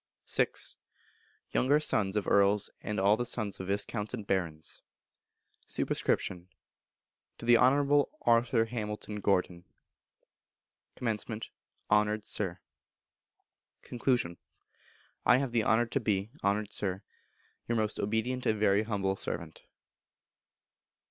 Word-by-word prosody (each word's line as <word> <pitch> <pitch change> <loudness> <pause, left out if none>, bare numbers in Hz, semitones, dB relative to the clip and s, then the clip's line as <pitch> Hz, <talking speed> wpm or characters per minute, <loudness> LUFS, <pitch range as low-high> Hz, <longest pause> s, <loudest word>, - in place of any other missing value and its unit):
vi. - - +5 1.1
Younger 145 +4 +3
Sons 105 -9 +1
of 105 - -1
Earls, 100 0 +3
and 105 -1 -3
all 100 +2 +5
the 120 - -2
Sons 110 -4 -2
of 95 - -5
Viscounts 105 +3 -1
and 110 -4 -7
Barons. 85 -6 -2 0.9
Sup. - - -2
To 90 -1 -1 1.0
the 120 0 +7
Honourable 140 +3 +4
Arthur 115 0 +3
Hamilton 105 -2 -5
Gordon. 90 -3 0 1.3
Comm. 110 -1 -3 0.5
Honoured 105 0 +2
Sir. 95 -4 -2 1.2
Con. 120 -8 0 0.9
I 125 - +6
have 135 -2 -1
the 115 -2 +2
honour 110 +3 +3
to 130 +4 -1
be, 105 -2 -1
Honoured 100 +1 0
Sir, 95 0 -2 0.6
Your 120 - 0
most 110 -1 0
obedient 110 +5 -1
and 110 -1 +1
very 105 -1 +4
humble 100 -3 -1
servant. - - -3
105 Hz, 110 wpm, -31 LUFS, 100-120 Hz, 1.3 s, the